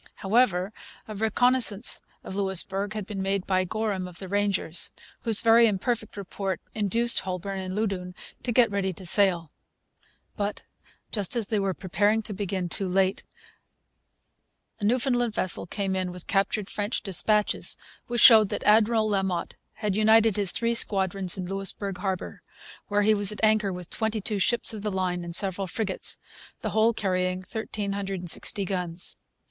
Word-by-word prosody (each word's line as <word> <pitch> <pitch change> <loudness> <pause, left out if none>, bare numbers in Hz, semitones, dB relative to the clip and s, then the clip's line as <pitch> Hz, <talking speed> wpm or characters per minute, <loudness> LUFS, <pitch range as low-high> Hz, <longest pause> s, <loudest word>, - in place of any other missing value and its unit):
However, 195 -3 +1 0.4
a 215 - -7
reconnaissance 220 +1 +3 0.2
of 190 - -7
Louisbourg 195 +1 0
had 215 -2 -5
been 200 -1 -5
made 195 0 -1
by 185 -1 +1
Gorham 200 -2 -3
of 180 -1 -12
the 190 - -8
Rangers, 195 -4 -1 0.3
whose 225 -3 +3
very 230 0 +6
imperfect 215 +1 -2
report 195 -2 -4
induced 230 +3 +2
Holbourne 190 +1 -5
and 185 0 -5
Loudoun 195 -4 -2 0.3
to 245 - -3
get 235 -2 +3
ready 195 -2 -1
to 185 +2 -11
sail. 175 -4 +2 0.8
But, 205 -1 -4 0.5
just 205 0 -1
as 225 -4 -2
they 215 - 0
were 195 -2 -1
preparing 205 +3 0
to 210 - -5
begin, 190 -2 -3
too 190 +3 0
late, 190 +1 +1 1.6
a 205 - -3
Newfoundland 245 -1 +1
vessel 185 -1 -1
came 195 0 -3
in 185 -1 -2
with 180 -1 -10
captured 200 0 0
French 205 +3 -3
dispatches 210 +2 +2 0.3
which 240 -2 -1
showed 220 -4 +8
that - - -4
Admiral 220 +1 +3
La 200 -2 +1
Motte 185 -3 -3 0.2
had 210 -3 -3
united 220 0 +4
his 200 -3 +4
three 235 0 +1
squadrons 195 -4 +2
in 185 - -4
Louisbourg 195 0 -4
harbour, 190 -1 -4 0.5
where 205 0 +1
he 215 +1 +4
was 205 -1 +6
at 210 - -7
anchor 215 -2 +3
with 180 -2 -8
twenty 220 0 -2
two 205 0 -2
ships 235 +3 +1
of 215 - -7
the 210 - -2
line 185 -2 -2
and 170 0 -2
several 195 0 +2
frigates, 195 +1 -1 0.4
the - - -3
whole 220 +1 +3
carrying 185 -3 -1
1,360 200 -3 -2
guns. 180 -2 -3
200 Hz, 160 wpm, -26 LUFS, 190-215 Hz, 1.6 s, showed